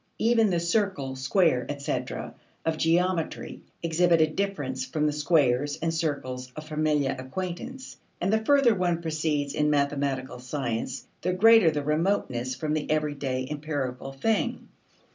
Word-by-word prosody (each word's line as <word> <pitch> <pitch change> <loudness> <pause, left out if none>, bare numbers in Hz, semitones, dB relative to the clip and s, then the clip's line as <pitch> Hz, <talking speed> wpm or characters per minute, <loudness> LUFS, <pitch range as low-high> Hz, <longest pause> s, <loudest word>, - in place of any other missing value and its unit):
Even 225 -1 +3
the 175 -2 +1
circle, 170 -7 0
square, 135 -1 +2
etc., 140 -1 -3 0.3
of 160 -1 +1
geometry 170 0 0 0.2
exhibit 170 +1 +3
a 160 - +6
difference 155 -7 -2
from 150 +4 -1
the 150 - +1
squares 145 -3 +2
and 165 0 -1
circles 130 -6 -3
of 155 0 -8
familiar 150 -3 +1
acquaintance, 185 - -6 0.2
and 190 +4 0
the 220 0 +2
further 275 -2 +5
one 175 -3 0
proceeds 155 -3 -1
in 150 0 +1
mathematical 140 -3 0
science 125 -2 -3 0.2
the 180 +1 0
greater 225 -1 +7
the 150 -2 -2
remoteness 150 -6 0
from 150 +4 -2
the 155 -1 -2
everyday 145 -4 -1
empirical 140 -3 -4
thing. 210 +12 -1
155 Hz, 140 wpm, -27 LUFS, 135-175 Hz, 0.3 s, greater